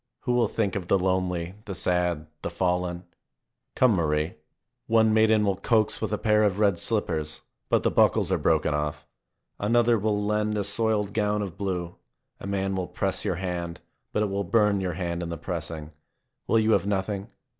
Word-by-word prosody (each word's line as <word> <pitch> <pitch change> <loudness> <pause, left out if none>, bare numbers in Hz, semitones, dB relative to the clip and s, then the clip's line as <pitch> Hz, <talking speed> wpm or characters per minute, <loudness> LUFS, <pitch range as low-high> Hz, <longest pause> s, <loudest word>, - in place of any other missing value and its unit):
Who 125 - -1
will 120 -2 +3
think 100 -3 -1
of 95 -3 -4
the 100 - +4
lonely, 90 -2 -1
the 100 - -5
sad, 90 -3 0 0.2
the - - -3
fallen? 90 -1 -1 0.7
Come, 130 -2 +5
Marie. 75 -1 0 0.5
One 110 -1 +4
maiden 110 -1 +4
will 100 -2 +1
coax 110 -1 +1
with - - -2
a 105 - 0
pair 105 0 +3
of 105 -2 +1
red 100 -5 +3
slippers, 80 -9 0 0.3
but - - +2
the - - +2
buckles - - +3
are - - +2
broken 80 -1 +2
off. 75 0 -3 0.5
Another 115 +2 +3
will 105 0 0
lend 105 0 0
a 100 - 0
soiled 105 0 0
gown 105 -1 0
of 95 -4 -6
blue. 90 -3 -3 0.4
A - - -7
man 95 -1 -1
will 90 -1 -2
press - - -1
your - - 0
hand, 85 -2 -4 0.3
but 105 - +1
it 105 - -1
will 100 +1 -1
burn 105 +1 +2
your 90 -2 -2
hand 85 0 -3
in 85 - -4
the 85 - -4
pressing. 80 -2 -5 0.6
Will 115 - +3
you 110 0 +3
have 100 - +2
nothing 100 0 -2
95 Hz, 190 wpm, -26 LUFS, 85-105 Hz, 0.7 s, Come